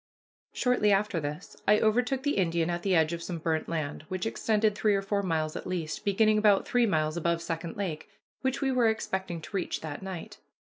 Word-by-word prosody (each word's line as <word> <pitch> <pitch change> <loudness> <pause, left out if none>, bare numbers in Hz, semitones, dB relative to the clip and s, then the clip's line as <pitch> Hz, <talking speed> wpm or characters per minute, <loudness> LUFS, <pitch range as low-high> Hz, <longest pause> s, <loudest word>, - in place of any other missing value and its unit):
Shortly 250 -5 +2
after 195 -3 +2
this 150 0 -6
I 210 +1 +6
overtook 245 +4 +1
the 285 -4 0
Indian 170 -2 +1
at 175 0 -2
the 190 0 +2
edge 160 0 +3
of 170 - -4
some 175 0 -4
burnt 160 -1 -1
land, 155 -3 -3
which 185 +1 -3
extended 220 -1 +1
three 210 0 +2
or 195 - 0
four 200 +1 0
miles 160 -4 -1
at - - -5
least, 170 -4 -3
beginning 215 +1 +3
about 210 -2 +4
three 245 -1 +3
miles 155 -3 0
above 170 0 +1
Second 165 0 -4
Lake, 170 -6 -4 0.3
which 265 +1 -1
we 270 -1 +1
were 250 -3 +3
expecting 190 -6 -3
to 180 - -9
reach 185 - -2
that 150 0 -6
night. 190 -3 -7
190 Hz, 205 wpm, -29 LUFS, 165-215 Hz, 0.3 s, I